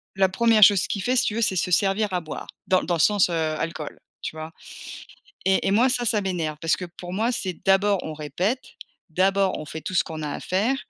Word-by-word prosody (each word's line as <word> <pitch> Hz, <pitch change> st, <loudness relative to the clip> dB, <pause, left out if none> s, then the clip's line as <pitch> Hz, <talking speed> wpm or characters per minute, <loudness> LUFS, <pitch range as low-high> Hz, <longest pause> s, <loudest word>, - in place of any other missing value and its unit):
la 190 Hz, -1 st, +3 dB
1re 225 Hz, +2 st, +4 dB
chose 195 Hz, -3 st, +6 dB
qu'il 200 Hz, -, -3 dB
fait 250 Hz, +4 st, +1 dB
si 250 Hz, -, +3 dB
tu 210 Hz, -, -1 dB
veux 230 Hz, -, -1 dB
c'est 200 Hz, -4 st, +2 dB
se 180 Hz, -, 0 dB
servir 200 Hz, +3 st, +2 dB
à 180 Hz, -, 0 dB
boire. 155 Hz, -, -7 dB, 0.2 s
Dans 185 Hz, -, +4 dB
l -, -, -6 dB
dans 175 Hz, -, +1 dB
le -, -, -4 dB
sens, 205 Hz, +2 st, +4 dB
heu, -, -, -3 dB, 0.2 s
alcool, 160 Hz, -2 st, -5 dB, 0.2 s
tu -, -, -5 dB
vois? 155 Hz, 0 st, -7 dB, 1.0 s
Et 190 Hz, 0 st, +2 dB
et -, -, +2 dB
moi 235 Hz, +6 st, +4 dB
ça 245 Hz, -1 st, 0 dB
ça 215 Hz, -2 st, +2 dB
m'énerve, 170 Hz, -6 st, -3 dB
parce 165 Hz, -1 st, +1 dB
que -, -, -6 dB
pour 175 Hz, 0 st, -9 dB
moi 225 Hz, +6 st, 0 dB
c'est 190 Hz, -6 st, -2 dB
d'abord 195 Hz, +1 st, +3 dB
on 155 Hz, -, -5 dB
répète, 175 Hz, -, -2 dB, 0.5 s
d'abord 190 Hz, +3 st, +1 dB
on -, -, -6 dB
fait 160 Hz, +2 st, -7 dB
tout 185 Hz, -, -6 dB
ce -, -, +3 dB
qu'on 160 Hz, -1 st, -7 dB
a 150 Hz, -, -3 dB
à -, -, -5 dB
faire 210 Hz, +9 st, 0 dB
190 Hz, 250 wpm, -24 LUFS, 170-210 Hz, 1.0 s, chose